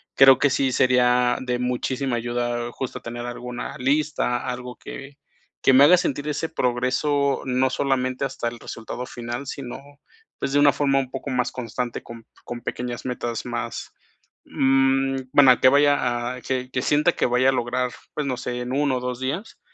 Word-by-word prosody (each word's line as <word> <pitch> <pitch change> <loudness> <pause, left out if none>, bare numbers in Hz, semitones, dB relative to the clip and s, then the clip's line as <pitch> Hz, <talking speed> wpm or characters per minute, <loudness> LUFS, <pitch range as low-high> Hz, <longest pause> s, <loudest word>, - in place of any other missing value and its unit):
creo 135 -1 +8
que 145 - +4
sí 135 -1 +1
sería 125 -1 +3
de 125 -1 -1
muchísima 125 +1 -1
ayuda, 120 0 -2
justo, 130 - -5
tener 120 0 -6
alguna 120 0 -6
lista, 135 -2 0
algo 125 0 -5
que 140 0 -10 0.4
que 135 - +5
me 135 +2 +8
haga 180 +3 +7
sentir 145 -4 -2
ese 150 +2 -2
progreso, 140 +1 0
no 130 0 +1
solamente 130 -1 -1
hasta 130 -3 -3
el 120 0 -5
resultado 120 +2 -7
final, 120 +3 -6
sino, 130 -3 -6 0.6
pues, 135 - -2
de 145 - +4
una 145 -1 +6
forma 135 -1 +2
un 130 -1 -4
poco 135 +1 -5
más 125 -1 0
constante, 125 -1 -4
con 115 -1 -11 0.2
con 120 0 -6
pequeñas 120 -1 -4
metas 120 -2 -3
más, 120 -1 -5 0.5
mm, 135 0 +2 0.2
bueno, 130 -3 +7
que - - +7
vaya 125 -4 +2
a 125 - -10
que 130 0 -3
que 125 - -1
sienta 150 +3 +3
que - - 0
vaya 125 +2 +3
a - - +5
lograr, 125 0 -1 0.2
pues, 150 - -2
no 130 -2 -2
sé, 125 0 -4
en 125 +1 -4
1 140 -2 +1
o - - -5
2 125 0 -4
días. 165 +12 -4
125 Hz, 180 wpm, -23 LUFS, 120-135 Hz, 0.6 s, creo